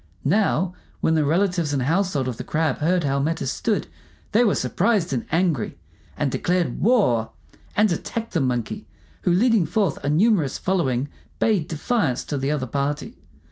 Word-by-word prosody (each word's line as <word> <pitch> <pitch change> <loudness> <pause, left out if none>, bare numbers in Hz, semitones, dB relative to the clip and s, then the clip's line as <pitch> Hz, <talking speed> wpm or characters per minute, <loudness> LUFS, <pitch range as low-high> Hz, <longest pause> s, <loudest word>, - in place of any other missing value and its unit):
Now, 185 +1 +2 0.3
when 160 - +2
the 155 -1 +3
relatives 170 0 +1
and 135 -3 0
household 160 -2 +1
of 125 -3 -3
the - - -5
Crab 155 -3 0
heard 175 +3 +2
how 140 -1 +1
matters 150 -2 -1
stood, 220 -3 -1 0.5
they 230 +3 +4
were 210 - +3
surprised 205 -11 +1
and 120 - -2
angry, 165 - 0 0.4
and 145 -3 0
declared 175 -4 0
war, 180 - +3 0.5
and 210 -1 +4
attacked 225 +7 -4
the 165 - +1
Monkey, 125 - -2 0.3
who, 180 - +1
leading 210 -1 +3
forth 180 -3 0
a 145 - 0
numerous 165 - +2
following, 140 -9 0 0.3
bade 200 -8 +1
defiance 160 - 0
to 145 - -3
the 135 +1 -1
other 145 -3 -1
party. 145 - -3
160 Hz, 165 wpm, -23 LUFS, 140-195 Hz, 0.5 s, they